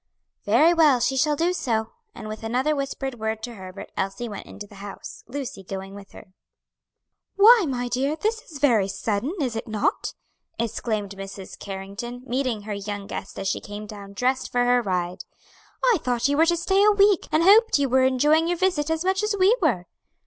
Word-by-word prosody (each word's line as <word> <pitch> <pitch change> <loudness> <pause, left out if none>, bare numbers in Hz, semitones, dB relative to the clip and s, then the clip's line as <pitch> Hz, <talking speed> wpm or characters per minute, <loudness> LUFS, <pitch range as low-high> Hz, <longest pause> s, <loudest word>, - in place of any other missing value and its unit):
"Very 330 +3 +5
well, 305 -6 +5
she 265 +3 +1
shall 295 +3 +2
do 340 +4 +1
so," 225 -9 -1 0.2
and 215 - -8
with 215 0 -7
another 255 +7 0
whispered 270 -2 -4
word 220 0 -3
to 240 - -5
Herbert, 190 -2 -10
Elsie 195 +5 -3
went 210 - -8
into 205 - -9
the 200 -1 -14
house, 200 -1 -9
Lucy 265 -5 -6
going 195 +1 -7
with 200 -1 -12
her. 185 -3 -14 1.0
"Why, 430 +1 +7
my 245 -2 -2
dear, 265 +5 0
this 440 +7 -1
is 310 - -8
very 235 -9 +3
sudden, 215 - -2
is 255 -6 -1
it 225 - -4
not?" 215 -2 -1 0.4
exclaimed 215 -2 -2
Mrs. 195 0 -9
Carrington, 200 +6 -7
meeting 250 -4 -2
her 210 0 -4
young 200 0 -5
guest 195 - -7
as 195 - -3
she - - -1
came 205 +1 -8
down 200 -1 -10
dressed 255 +5 -1
for 245 0 +2
her 245 0 +4
ride. 180 -4 -2 0.6
"I 480 -7 +4
thought 245 0 0
you 285 - +1
were 325 +3 +4
to 345 0 +2
stay 385 +4 +2
a 425 - +6
week, 405 -2 +4
and 310 +2 +3
hoped 430 +3 +6
you 280 -1 +1
were 260 +1 +3
enjoying 295 +5 +3
your 350 0 0
visit 330 -5 +1
as 320 +2 -1
much 380 +1 +1
as 425 0 0
we 390 +5 +5
were." 235 - +1
245 Hz, 200 wpm, -24 LUFS, 205-310 Hz, 1.0 s, Why